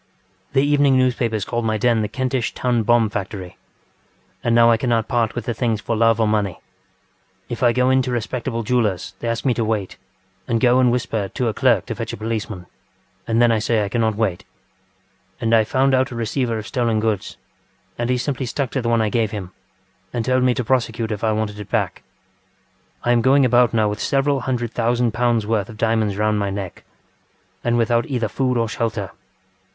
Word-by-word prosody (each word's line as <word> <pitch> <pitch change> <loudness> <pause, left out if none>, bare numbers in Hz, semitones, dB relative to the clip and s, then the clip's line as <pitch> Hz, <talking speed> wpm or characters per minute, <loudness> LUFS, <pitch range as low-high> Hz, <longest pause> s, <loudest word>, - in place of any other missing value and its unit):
The 135 - +3
evening 145 -2 +3
newspapers 120 -5 +1
called 120 0 -2
my 110 -1 0
den 115 0 +2
the 105 - -1
Kentish 130 +2 -2
Town 125 -2 +1
Bomb 115 -1 +3
Factory. 95 -2 -5 0.9
And 115 -1 +2
now 115 0 +6
I 115 - +4
cannot 115 -2 0
part 120 -4 0
with 120 -2 -4
the 120 - -1
things 115 -2 -1
for 115 +2 -2
love 115 0 +3
or 110 - +3
money. 105 -4 0 0.9
ŌĆ£If 120 - -4
I 120 -2 +5
go 125 +2 +2
in 130 0 +4
to 130 0 -3
respectable 120 0 -3
jewellers 105 -6 0
they 120 - -4
ask 115 +2 -2
me 130 - +3
to 115 - -1
wait, 105 -3 -2 0.5
and 115 -1 +1
go 125 +1 +4
and 125 -2 +4
whisper 115 -4 -1
to 125 - -2
a - - -2
clerk - - +2
to - - -4
fetch - - -5
a - - -5
policeman, 110 -3 -4 0.6
and 115 0 +1
then 120 -1 +5
I 110 - +2
say 110 -1 +1
I - - -4
cannot 110 -1 0
wait. 100 -5 -1 1.0
And 115 0 0
I 110 -1 +6
found 130 +5 +1
out 130 0 +2
a 120 - -7
receiver 115 +1 -1
of 110 - -6
stolen 115 -2 0
goods, 110 -3 -2 0.6
and 120 0 -2
he 125 - +2
simply 130 0 -2
stuck 130 +1 -2
to 135 - -1
the 120 - -1
one 115 -1 +2
I 110 - 0
gave 115 -1 +1
him 100 -4 -6 0.6
and 115 -2 -2
told 130 0 +2
me 125 -1 +3
to 125 - -1
prosecute 115 -2 0
if 105 0 -4
I 110 - +2
wanted 105 -1 -2
it 105 - -8
back. - - -1 1.0
I 120 - +2
am 120 -1 +4
going 135 +2 +4
about 125 -1 +4
now 110 -2 +2
with 105 +1 -3
several 140 0 +1
hundred 120 -2 -2
thousand 120 0 +1
pounds 120 -2 +1
worth 105 -2 -1
of 110 - -10
diamonds 110 -3 +1
round 105 0 +1
my 100 -1 -1
neck, 95 -2 -6 0.8
and 120 0 +1
without 120 0 +1
either 120 -5 -1
food 125 +3 0
or 115 -1 +1
shelter. 110 -3 -3
115 Hz, 210 wpm, -21 LUFS, 110-125 Hz, 1.0 s, now